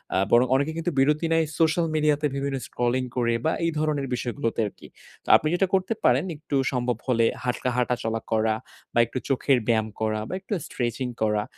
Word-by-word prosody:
আ - - +3
বরং 120 +2 +6
অনেকে 140 +4 +1
কিন্তু 165 +1 -1
বিরতি 150 +4 +3
নেয় 165 0 +3
সোশ্যাল 165 +1 +3
মিডিয়াতে 150 -1 +2
বিভিন্ন 140 0 -2
স্ক্রলিং 120 +1 0
করে 115 -1 +2
বা 160 - +3
এই 165 - +1
ধরনের 150 -3 0
বিষয়গুলোতে 115 -2 -3
আরকি। - - -12 0.4
তো - - -27
আপনি 155 - +3
যেটা 190 +2 +2
করতে 190 +3 +2
পারেন 125 +5 +4
একটু 145 -1 -5 0.2
সম্ভব 125 -2 -1
হলে 115 -3 +3 0.2
হাটকা 125 0 -1
হাঁটা 125 0 +1
চলা 115 0 -2
করা 110 0 +2 0.4
বা 120 - +2
একটু 115 - -6
চোখের 135 0 +3
ব্যায়াম 110 -2 +2
করা 110 -1 0
বা - - -6
একটু 190 +2 -6
স্ট্রেচিং 125 +1 -2
করা 105 -1 +1
130 Hz, 190 wpm, -25 LUFS, 115-155 Hz, 0.4 s, বরং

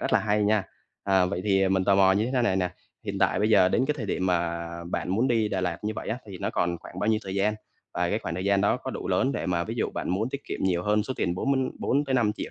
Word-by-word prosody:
rất - - -2
là 110 - +6
hay 105 +1 +1
nha! 105 -1 +3 0.4
À, 95 -2 +3
vậy 90 -1 -3
thì 95 -2 +3
mình 95 -1 +1
tò 100 - +4
mò 95 -1 +5
như 110 +6 0
thế 125 - +2
này 95 -5 +2
nè, 90 -1 0 0.3
hiện - - -3
tại - - +2
bây 105 +1 +2
giờ 95 -4 +5
đến 130 - +2
cái 150 - 0
thời 110 -6 -4
điểm 95 -1 -1
mà 85 -1 0 0.2
bạn - - -2
muốn 115 +7 +2
đi 110 -3 +2
Đà 95 -2 -1
Lạt 90 -2 -2
như 110 - -1
vậy - - -5
á, 120 - -2
thì 95 -3 -8
nó - - -2
còn 85 0 -1
khoảng 90 - -11
bao 105 - 0
nhiêu 110 -1 +3
thời 95 0 -5
gian? 105 +2 +1 0.4
Và - - 0
cái - - +1
khoảng 85 - -5
thời 95 - -3
gian 100 0 +3
đó 100 - +2
có - - -6
đủ - - -5
lớn 135 +1 +2
để - - -3
mà 85 -1 0
ví - - -5
dụ - - -1
bạn - - -4
muốn 105 +6 0
tiết 140 - -6
kiệm - - -5
nhiều 90 -2 +1
hơn 105 +1 +2
số 130 - -4
tiền 85 -1 0
4 140 +9 0
mới 135 - +2 0.2
4-5 130 -5 +1
triệu - - -6
100 Hz, 305 wpm, -26 LUFS, 90-110 Hz, 0.4 s, là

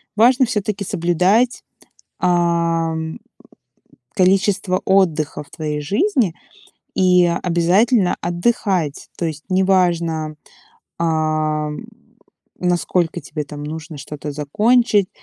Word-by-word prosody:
важно 245 +4 +5
всё-таки 210 -3 -2
соблюдать, 185 +7 +1 0.6
а, 170 -2 +1
м, 160 0 -5 1.0
количество 190 0 +2
отдыха 170 -7 +1
в - - -25
твоей 150 -2 -4
жизни 210 - +1 0.6
и 180 -1 +4 0.2
обязательно 180 +5 +2
отдыхать. 175 -3 -1
То 175 - -2
есть 155 -1 -6
неважно, 170 -5 +1 0.6
а, 155 -2 0
м, 150 - -7 0.7
насколько 175 -1 0
тебе 150 -2 -5
там 145 +1 -9
нужно 155 0 -7
что-то 150 +1 -7
закончить 205 - +2
175 Hz, 95 wpm, -19 LUFS, 155-195 Hz, 1.0 s, важно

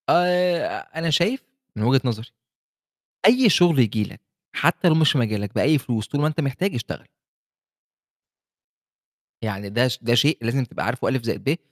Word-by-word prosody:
آآ، 180 0 +1
أنا 165 0 -2
شايف 195 - +1 0.3
من 105 - -3
وجهة 130 +3 +3
نظري 115 -1 -3 1.0
أي 250 +2 +6
شغل 175 -5 +4
ييجي 110 -3 +2
لك - - -12 0.3
حتى 180 - +2
لو 160 - +4
مش 155 -1 +3
مجالك 105 -5 -2
بأي 150 +2 +3
فلوس 115 -4 -3
طول 145 - -2
ما 150 - +2
أنت 155 +1 -3
محتاج، 155 +7 -2
اشتغل. 115 - -6 2.4
يعني 100 -2 -5
ده 120 +5 +2
ش 125 - -3
ده 120 0 +1
شيء 145 +7 +3
لازم 120 +3 -1
تبقى - - -6
عارفه 120 +2 -2
ألِف 130 -3 -1
زائد 115 - -4
ب، - - -11
يقول 155 - +1
130 Hz, 170 wpm, -22 LUFS, 115-165 Hz, 2.4 s, أي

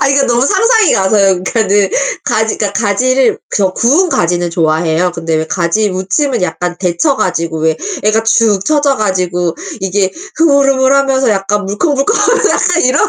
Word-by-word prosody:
아니 275 - +2
그 275 - +2
너무 240 +1 +1
상상이 445 - +2
가서요. 195 0 +2
그니까는 200 -2 +1 0.4
가지 220 0 -1
그니까 205 -2 -2
가지를 240 +5 +1 0.2
저 190 -3 +1
구운 290 - +2
가지는 175 - -1
좋아해요. 165 +1 0
근데 165 -2 -3
왜 160 0 -2
가지무침은 195 - -1
약간 180 -1 -3
데쳐 190 - 0
가지고 165 -3 -2
왜 160 0 0 0.3
애가 215 +1 +1
축 220 -3 +2
처져 290 -1 +1
가지고 180 -5 -1 0.3
이게 190 0 -1 0.2
흐물흐물하면서 275 -3 +2
약간 205 0 -1
물컹물컹하고 315 - 0
약간 350 -1 +1
이런. 275 +11 +2
210 Hz, 360 characters per minute, -12 LUFS, 180-275 Hz, 0.4 s, 아니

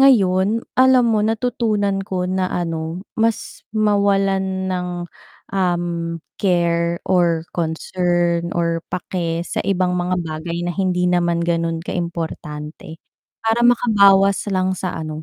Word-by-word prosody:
ngayon, 210 -4 +4
alam 255 -1 +5
mo 215 - +2
natutunan 220 -3 0
ko 190 -2 -3
na 185 0 0
ano, 165 +1 -3 0.2
mas 225 -1 -1 0.2
mawalan 195 -2 +1
ng, 180 -1 -2 0.7
um, 175 -2 +1 0.5
care 170 -2 +1
or 170 -3 +2
concern 170 +1 0
or 170 -1 0
pake 170 -2 -3
sa - - -2
ibang 185 -2 +1
mga 180 0 0
bagay 170 +1 -4
na 175 - -2
hindi 180 -2 +1
naman 175 -1 +2
gano'n 165 -1 0
ka 165 - -5
importante. 160 -2 -5 0.4
Para 225 +1 +1
makabawas 200 -5 +4
lang 185 -1 +1
sa 185 -2 -4
ano, 155 -1 -5
180 Hz, 120 wpm, -20 LUFS, 170-200 Hz, 0.7 s, alam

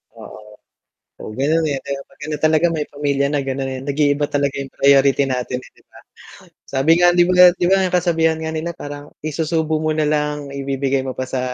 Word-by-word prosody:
Oo, - - -11 0.8
oo - - -7
ganun, 160 +4 +1
eh, 140 - -1
'di 140 +1 -6
ba 140 - -7
'pag - - -24
ganun 150 0 -4
talaga 155 +2 +3
may 150 -2 -2
pamilya 140 -1 -1
na 145 -1 0
ganon 135 0 -3
eh, 130 - -5
nag-iiba 145 0 +1
talaga 140 -1 -1
yung 135 -1 -6
priority 140 0 +4
natin 125 0 -2
eh, - - -16
di - - -23
ba. - - -16 0.7
Sabi 135 +3 0
nga, 175 - +7
'di 175 0 +5
ba 185 - +1 0.2
'di - - -1
ba, 190 +2 +4
ang 185 -1 -1
kasabihan 165 -2 +1
nga 160 0 -4
nila 160 +2 -3
parang 145 0 -9 0.2
isusubo 155 0 -1
mo 155 - 0
na 155 -1 0
lang, 150 -1 -2
ibibigay 135 -1 -1
mo 130 0 -4
pa 130 - -2
sa 130 0 -3
145 Hz, 215 wpm, -19 LUFS, 140-160 Hz, 0.8 s, nga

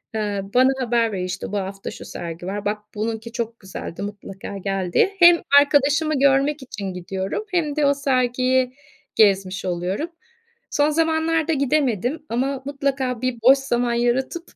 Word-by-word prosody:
Eee, 205 -2 -1
bana 255 +1 +5
haber 235 -2 +1
veriyor, 185 -2 -3
işte, 185 +1 -5
"Bu 205 - -1
hafta 195 0 -5
şu - - -10
sergi 170 +1 -7
var, 200 +1 -4
bak 210 +1 0 0.2
bununki 225 +2 -3
çok 230 0 -4
güzeldi, 190 -2 -7
mutlaka 200 -1 -7
gel" 195 -2 -3
diye. 395 - +3
Hem 345 0 +7 0.2
arkadaşımı 290 +1 +2
görmek 280 +1 +3
için 200 -7 -6
gidiyorum 190 - -4
hem 315 -5 0
de 300 -2 +2
o 280 - +4
sergiyi 255 -1 +1 0.4
gezmiş 195 -2 +3
oluyorum. 185 - -2 0.6
Son 290 +1 +3
zamanlarda 320 0 +1
gidemedim 280 - 0
ama 265 +3 -1
mutlaka 270 -3 -2
bir 255 -2 -2
boş 265 +3 +7
zaman 245 -3 0
yaratıp 255 +8 -1
245 Hz, 150 wpm, -22 LUFS, 200-280 Hz, 0.6 s, Hem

